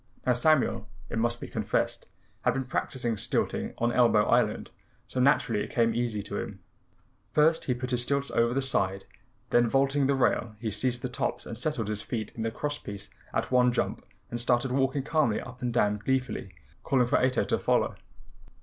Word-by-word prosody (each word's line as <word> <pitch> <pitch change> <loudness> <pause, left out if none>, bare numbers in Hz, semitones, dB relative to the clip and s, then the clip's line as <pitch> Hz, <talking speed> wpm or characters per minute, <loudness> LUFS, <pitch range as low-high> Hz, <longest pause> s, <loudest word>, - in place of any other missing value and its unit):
Now 125 - +4
Samuel, 125 -5 +2 0.2
it 115 - -1
must 120 +1 +1
be - - -6
confessed, - - -1 0.3
had - - +1
been 135 - -1
practicing 120 -2 -2
stilting 110 +2 -1
on 120 +1 +1
Elbow 115 -4 +4
Island, - - +1 0.3
so 130 - -4
naturally 125 -5 +3
it - - -7
came 115 -1 +2
easy 115 -3 -1
to 100 - -4
him. 100 -2 -6 0.7
First 160 +2 +3
he 125 - 0
put 125 +1 -5
his 125 -1 +1
stilts 140 +2 0
over 115 0 +2
the 135 - +1
side, 95 -7 0 0.5
then 120 -1 +4
vaulting 135 +1 +2
the 140 - +2
rail, 115 -4 +1
he 110 -1 -3
seized 120 +4 -1
the - - 0
tops 125 - -3
and - - -6
settled 120 -2 -2
his 105 -1 -2
feet 110 -2 -4
in 115 - -6
the 115 - 0
cross 145 +5 -3
pieces 100 0 -9 0.2
at - - -2
one 125 -1 +5
jump - - -2 0.3
and 120 0 -3
started 120 +1 +1
walking 135 +1 +1
calmly 150 -8 +1
up 125 +1 -10
and 125 -1 -1
down 105 -3 +2
gleefully 125 -6 -2 0.3
calling 130 -2 +3
for 120 - +2
Ato 130 -1 +2
to - - 0
follow. - - +1
120 Hz, 195 wpm, -28 LUFS, 115-130 Hz, 0.7 s, one